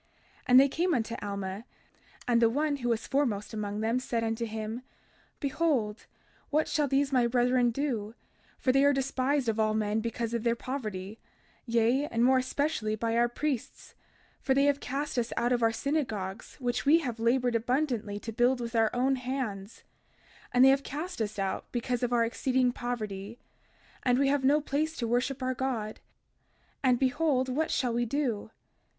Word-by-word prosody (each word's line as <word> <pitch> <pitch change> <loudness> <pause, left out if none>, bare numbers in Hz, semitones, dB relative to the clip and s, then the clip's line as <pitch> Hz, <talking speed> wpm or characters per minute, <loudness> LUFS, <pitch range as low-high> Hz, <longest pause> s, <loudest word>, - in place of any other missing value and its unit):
32:5 - - -39 0.4
And 250 +1 +8
they 275 - +6
came 345 +5 0
unto 230 -1 -2
Alma; 200 +1 -4 0.6
and 240 -1 +3
the 230 - +5
one 290 +4 0
who 240 -3 -2
was 230 -1 0
the - - -10
foremost 240 -7 0
among 210 -1 -3
them 225 +3 +1
said 235 -2 -2
unto 225 +1 -1
him: 220 +2 -5 0.6
Behold, 275 -7 -1 0.4
what 305 +2 +1
shall 295 -2 +1
these 275 +1 +1
my 250 -3 +3
brethren 245 0 +3
do, 235 -4 -2 0.4
for 255 - +2
they 270 +2 +4
are 285 0 +5
despised 270 0 0
of 225 -1 0
all 215 0 +2
men 215 0 0
because 230 +1 -3
of 235 - 0
their 235 0 +1
poverty, 220 -6 -5 0.5
yea, 235 +5 +2
and 230 -2 +1
more 260 0 +5
especially 255 -4 -1
by 225 +1 -1
our 240 +1 +3
priests; 270 0 -4 0.5
for 265 - +1
they 275 - +4
have 285 0 +3
cast 280 0 -2
us 235 0 -2
out 240 +1 +1
of 245 -1 +2
our 225 0 +4
synagogues 225 -7 -3
which 245 -2 -2
we 300 +4 +6
have 245 -6 -4
labored 245 +1 +2
abundantly 235 -3 -1
to 225 - -6
build 245 +3 +2
with 235 0 -5
our 225 -1 +4
own 265 +2 +2
hands; 245 -6 -4 0.7
and 250 +1 +6
they - - +8
have 270 +1 +4
cast 305 +2 -5
us 215 -1 -3
out 195 -1 -3
because 245 0 -2
of 245 -1 0
our 235 -1 +3
exceeding 255 +1 +1
poverty; 220 -3 -5 0.6
and 250 -1 +2
we 275 0 +3
have 285 -1 +1
no 285 +3 +4
place 305 +2 -2
to 235 - -2
worship 250 +3 0
our 255 0 0
God; 240 -5 -3 0.8
and 255 -2 +3
behold, 260 0 +1
what 310 +5 0
shall 245 -3 0
we 240 +1 +1
do? 240 -5 -1
245 Hz, 185 wpm, -29 LUFS, 225-270 Hz, 0.8 s, And